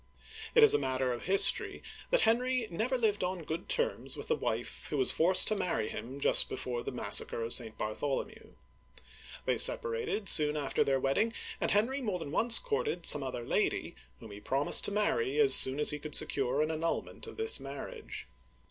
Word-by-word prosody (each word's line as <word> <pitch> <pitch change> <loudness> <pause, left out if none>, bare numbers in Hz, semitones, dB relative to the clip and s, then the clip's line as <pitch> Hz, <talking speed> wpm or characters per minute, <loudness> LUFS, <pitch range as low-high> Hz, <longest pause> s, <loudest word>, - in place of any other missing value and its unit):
^ - - -29 0.3
It 460 - +5
is 445 - +6
a - - +1
matter 130 -1 -3
of 120 - -9
history 195 +2 +4 0.3
that - - +1
Henry 245 +1 -1
never 235 +9 -3
lived 215 -4 -2
on 180 -1 -5
good 160 +2 -7
terms - - -2
with - - -10
the 470 - +1
wife - - -5
who - - -5
was 390 - +5
forced 180 +3 +3
to 215 - -1
marry 180 - -3
him 130 +4 -9
just - - +4
before 125 -2 -6
the - - -7
massacre 115 -1 +1
of 115 - -2
St. 110 -3 -1
Bartholomew. 135 +6 -6 0.9
They - - 0
separated 460 - +2
soon 150 -2 +5
after 145 -2 -2
their 135 -1 -1
wedding, 140 - -2 0.3
and - - -1
Henry 240 +7 -1
more 210 -7 -4
than 155 -5 -8
once 230 +8 +3
courted 465 -1 -4
some 145 - +6
other 130 -3 -7
lady, - - -3 0.3
whom 110 - -13
he 100 - -11
promised 135 +6 +2
to - - -2
marry 395 - -2
as 425 -2 +4
soon 130 +2 +4
as 150 - +3
he 150 - -6
could 150 0 -6
secure 135 +2 +1
an 155 - -4
annulment 165 - -5
of 445 - -12
this 445 0 +2
marriage. 135 0 -10
170 Hz, 195 wpm, -29 LUFS, -, 0.9 s, is